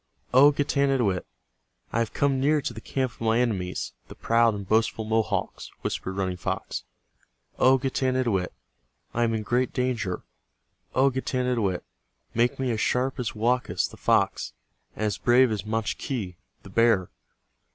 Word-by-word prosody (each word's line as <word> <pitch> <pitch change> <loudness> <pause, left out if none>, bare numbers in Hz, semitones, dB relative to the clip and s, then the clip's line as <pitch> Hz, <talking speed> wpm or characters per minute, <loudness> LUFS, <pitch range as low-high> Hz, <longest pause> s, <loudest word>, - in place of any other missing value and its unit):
"O 140 +3 +8
Getanittowit, 135 -9 +1 0.7
I 115 - +1
have 115 -2 0
come 140 -2 +1
near 150 +3 +3
to 125 - -4
the 110 - -9
camp 130 0 -2
of - - -22
my 115 +1 +2
enemies, 95 -7 -1
the - - -11
proud 115 -1 +3
and 100 -2 -7
boastful 110 +1 +1
Mohawks," 110 0 -1
whispered 95 - -3
Running 95 -2 -2
Fox. - - -4 0.7
"O 130 +1 +6
Getanittowit, 130 -7 0 0.6
I 120 - +1
am 115 -1 0
in 110 - -2
great 125 +3 0
danger. 125 -8 -1 0.7
O 135 +1 +4
Getanittowit, 125 -7 -1 0.5
make 120 +1 +2
me 130 -2 -1
as 110 -2 -1
sharp 130 +1 0
as 120 -3 -3
Woakus, 120 +3 +1
the - - -13
fox, - - +1 0.4
and 110 - -2
as 105 -3 -1
brave 125 0 +5
as 105 -1 -3
Machque, 110 -2 -2 0.3
the - - -11
bear. 115 -6 +3
115 Hz, 150 wpm, -26 LUFS, 105-130 Hz, 0.7 s, O